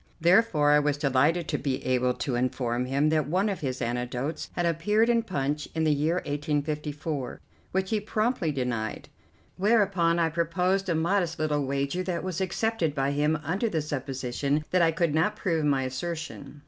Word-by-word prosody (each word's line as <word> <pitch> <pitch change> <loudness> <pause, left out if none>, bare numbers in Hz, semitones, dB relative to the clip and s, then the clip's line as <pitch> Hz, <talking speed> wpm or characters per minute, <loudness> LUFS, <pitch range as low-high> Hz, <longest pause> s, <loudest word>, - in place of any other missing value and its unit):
Therefore 170 -4 +4
I 150 - +6
was 145 -1 0
delighted 150 +4 +2
to - - 0
be 135 -2 -2
able 125 -1 +1
to 135 - -3
inform 125 0 0
him 140 +4 +1
that 155 -2 +1
one 190 +7 +1
of 195 - -3
his 130 -3 -3
anecdotes 125 +5 -3
had 175 - -1
appeared 210 +8 +2
in 235 -1 +4
Punch 150 -8 -2
in 160 - +1
the 155 -1 +3
year 150 +4 +1
1854, 150 -2 -3 0.3
which 190 +1 -1
he 215 - +2
promptly 215 -3 0
denied, 120 -5 -3 0.5
whereupon 195 -5 +3
I 165 -1 +2
proposed 180 +4 0
a 170 - +2
modest 170 0 +1
little 150 -3 0
wager 140 +6 -1
that 180 -2 -3
was 185 -1 -3
accepted 190 -4 0
by 135 0 +1
him 150 +2 +1
under 190 +9 0
the 165 - 0
supposition 140 0 -2
that 180 - +3
I 165 - +5
could 165 -1 0
not 175 +7 +2
prove 165 -7 0
my 140 -2 +2
assertion. 145 +1 -5
155 Hz, 175 wpm, -27 LUFS, 140-180 Hz, 0.5 s, I